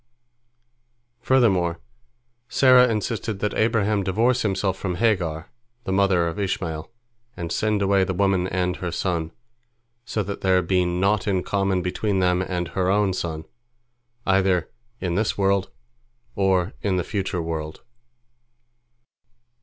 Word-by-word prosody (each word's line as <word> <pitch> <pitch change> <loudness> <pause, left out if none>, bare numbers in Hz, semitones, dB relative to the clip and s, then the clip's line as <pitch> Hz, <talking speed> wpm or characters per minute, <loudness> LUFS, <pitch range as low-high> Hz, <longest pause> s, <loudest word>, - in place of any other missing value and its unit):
" 120 0 -48 0.3
Furthermore, 95 -10 +2 0.7
Sarah 130 -2 +6
insisted 110 -1 -2
that 105 +1 -2
Abraham 110 -2 +1
divorce 115 +7 +1
himself 95 -2 0
from 95 -2 -3
Hagar, 90 -6 0 0.3
the - - -4
mother 95 -3 +3
of 85 +5 -4
Ishmael, 85 -5 -3 0.5
and 85 -1 -5
send 105 -2 0
away 100 -1 +3
the 95 0 -2
woman 95 -1 +1
and 90 -1 -1
her 90 -1 -4
son, 85 -2 -2 0.7
so 110 -3 -2
that 100 +1 -6
there 95 -1 +3
be 90 +1 +1
naught 95 +4 0
in 95 -3 +1
common 95 -2 0
between 95 +3 -1
them 90 -1 +2
and 90 -2 -3
her 95 -1 -1
own 100 -1 +2
son, 80 -3 -4 0.8
either 95 -3 +2 0.3
in 90 -2 -2
this 105 +4 0
world 100 -1 +1 0.7
or 95 -1 +1
in 100 -2 0
the 90 - 0
future 95 -2 -3
world. 80 -1 -5
95 Hz, 135 wpm, -23 LUFS, 90-105 Hz, 0.8 s, Sarah